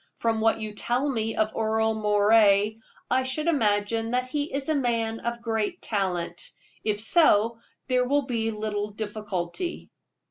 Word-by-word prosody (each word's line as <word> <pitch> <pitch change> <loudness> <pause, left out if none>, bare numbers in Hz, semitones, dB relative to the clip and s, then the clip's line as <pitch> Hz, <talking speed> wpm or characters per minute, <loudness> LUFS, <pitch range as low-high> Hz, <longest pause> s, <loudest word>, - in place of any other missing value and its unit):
From 225 -1 0
what 225 0 +3
you 215 -1 -5
tell 245 +6 0
me 225 -5 -1
of 215 0 0
Earle 220 0 +1
Moray, 210 0 +4 0.3
I 255 +1 +4
should 260 +4 -2
imagine 225 -6 +1
that 250 +1 0
he 290 +3 -2
is 275 0 -3
a 315 - +2
man 230 -5 0
of 235 0 -4
great 225 -3 -1
talent. 180 -5 -2 0.3
If 210 -1 0
so, 225 -3 +3 0.3
there 250 -1 +2
can 285 +1 +2
be 230 -3 -1
little 210 -1 -3
difficulty." 210 - -4
225 Hz, 150 wpm, -26 LUFS, 210-250 Hz, 0.3 s, Moray